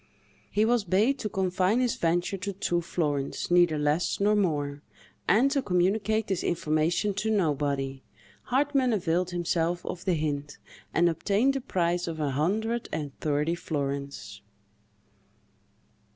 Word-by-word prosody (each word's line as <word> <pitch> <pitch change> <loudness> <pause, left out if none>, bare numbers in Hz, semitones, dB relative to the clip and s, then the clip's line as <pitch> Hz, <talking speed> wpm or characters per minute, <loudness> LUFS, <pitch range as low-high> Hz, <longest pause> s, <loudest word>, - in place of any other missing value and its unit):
He 210 +1 +2
was 235 -1 +2
bade 205 +9 +2
to 215 - -3
confine 190 +3 +1
his 250 -2 +1
venture 175 +3 0
to 195 +1 -4
two 175 -2 -1
florins, 150 -4 -2
neither 175 -3 +4
less 150 +3 0
nor 205 +1 +3
more; 145 -7 0 0.5
and 250 +8 +4
to 280 -1 +1
communicate 205 +2 +1
this 190 -4 -2
information 165 +4 0
to 210 +3 -2
nobody. 140 -8 0 0.4
Hartmann 270 -1 +2
availed 180 -2 0
himself 175 0 -1
of 180 0 -5
the 185 -3 +2
hint, 145 -2 -3 0.3
and 175 +1 +3
obtained 205 +10 +1
a 270 - -1
prize 175 -5 0
of 165 -1 -4
a 145 -2 0
hundred 220 - -1
and 150 -3 -4
thirty 150 +2 0
florins. 140 -10 -4
175 Hz, 135 wpm, -27 LUFS, 155-210 Hz, 0.5 s, neither